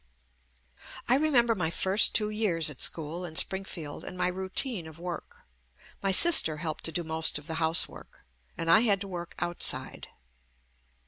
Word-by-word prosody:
I 240 - +3
remember 260 -6 +2
my 180 -7 -1
first 190 +5 +2
two 210 -1 +1
years 175 -8 0
at 140 - -11
school 165 +2 -2
in 165 -3 -9
Springfield 180 -5 -1
and 180 - -9
my 180 - 0
routine 190 - -2
of 160 0 -13
work. 175 0 -9 0.6
My 195 - -1
sis 335 - +8
ter 155 - -4
helped 155 -1 -6
to 165 - +3
do 175 +2 -3
most 160 -1 -1
of 145 - -11
the 160 0 -6
housework, 160 +1 -1 0.3
and 165 0 -1
I 170 - +6
had 210 -4 +2
to 200 - -6
work 175 -2 -8
outside. 175 0 -1
175 Hz, 170 wpm, -27 LUFS, 160-200 Hz, 0.6 s, sis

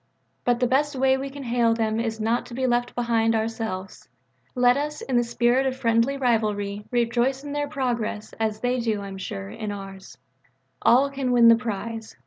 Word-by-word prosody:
But 245 -1 +2
the 250 - +2
best 280 +4 +1
way 265 0 +3
we 270 +1 -4
can 280 0 -8
hail 235 -2 +2
them 220 -1 0
is 225 -1 -2
not 225 +2 0
to 240 - -9
be 260 +1 -1
left 245 -1 0
behind 230 -2 +1
ourselves. 220 -4 -4 0.5
Let 245 0 +4
us, 300 +2 -3
in 260 - -3
the 240 - +4
spirit 240 +3 +2
of 260 0 -2
friendly 230 +2 +2
rivalry, 210 -5 0
rejoice 245 +2 +1
in 290 - -6
their 290 0 -1
progress, 240 -7 -3
as 220 -1 -1
they 250 +1 0
do, 220 -3 -1
I 200 - -6
am 195 0 -8
sure, 100 - -6
in 210 - -5
ours. 195 -1 -9 0.6
All 270 +4 +4
can 270 -2 -2
win 235 -1 +7
the 230 - +8
prize. 225 -1 -5
235 Hz, 195 wpm, -24 LUFS, 220-260 Hz, 0.6 s, the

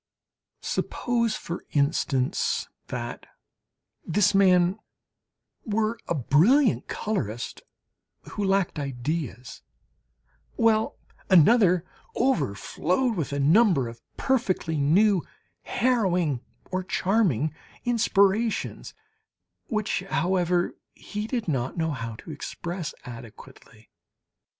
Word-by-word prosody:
Suppose, 235 -3 -1
for 170 - -6
instance, 140 -3 +1 0.2
that 120 -1 -6 0.8
this 205 +4 +2
man 185 0 +4 0.8
were 220 +1 -1
a 170 - 0
brilliant 195 - +3
colourist 120 - -3 0.7
who 205 - -3
lacked 195 -4 +1
ideas, 135 -2 -4 0.9
while 220 -1 +2 0.3
another 185 -1 +5 0.3
overflowed 225 - 0
with 160 -7 -2
a 140 - -2
number 165 - +4
of 115 0 -10 0.2
perfectly 220 -11 0
new, 185 +7 +4 0.4
harrowing, 180 - +1 0.3
or 185 0 -1
charming 180 - +1 0.3
inspirations, 220 -2 +1 0.7
which, 215 -2 -1
however 180 0 +1 0.2
he 210 +1 -5
did 235 -3 -2
not 130 -3 -1
know 160 -1 0
how 115 -5 -5
to 160 - -10
express 170 +3 -5
adequately. 115 -2 -12
180 Hz, 90 wpm, -26 LUFS, 140-215 Hz, 0.9 s, another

